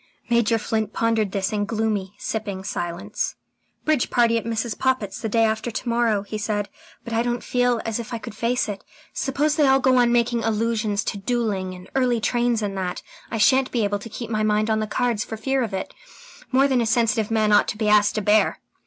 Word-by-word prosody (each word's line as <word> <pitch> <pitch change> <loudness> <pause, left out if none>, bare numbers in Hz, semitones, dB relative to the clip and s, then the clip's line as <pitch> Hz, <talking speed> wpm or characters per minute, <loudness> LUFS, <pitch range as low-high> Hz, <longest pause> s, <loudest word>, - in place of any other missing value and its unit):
Major 235 -1 +3
Flint 220 -1 -2
pondered 225 -3 +1
this 195 +2 -1
in 205 -1 0
gloomy, 210 -3 -2
sipping 205 -4 -4
silence. 175 +2 -3 0.5
"Bridge 305 -5 +2
party 235 -1 +3
at 230 - -1
Mrs. 225 -1 -2
Poppit's 260 -7 -1
the 220 - -2
day 225 +2 +3
after 220 +1 0
to 235 - -5
morrow," 230 -4 +1
he 210 +1 -5
said. 210 -1 -2 0.4
"I 230 0 0
don't 240 0 -2
feel 245 -1 +1
as 225 0 -2
if 235 - -7
I 235 - -2
could 225 0 -8
face 230 +3 0
it. 205 -2 -5 0.3
Suppose 290 +3 0
they 295 -3 +4
all 270 0 +5
go 260 -1 +3
on 240 -1 +4
making 235 -1 +1
allusions 220 -1 0
to 200 - -3
duelling 195 -4 -1
and 180 0 -12
early 250 -3 +2
trains 240 0 +1
and 200 -1 -2
that? 180 -1 -3 0.3
I 225 - -3
shan't 260 +4 +4
be 235 -3 0
able 205 0 0
to 230 - -9
keep 230 +1 -7
my 215 -1 0
mind 215 +1 +1
on 220 - +2
the 215 - -2
cards 235 -1 0
for 220 - -6
fear 270 +4 0
of 230 -4 -2
it. 190 -1 -4 0.6
More 270 +2 +4
than 260 -3 +2
a 230 - 0
sensitive 225 -2 +2
man 215 -1 +2
ought 205 - +5
to - - -3
be 215 -1 -1
asked 210 -1 +4
to 215 - 0
bear." 210 +2 +3
225 Hz, 220 wpm, -23 LUFS, 210-240 Hz, 0.6 s, all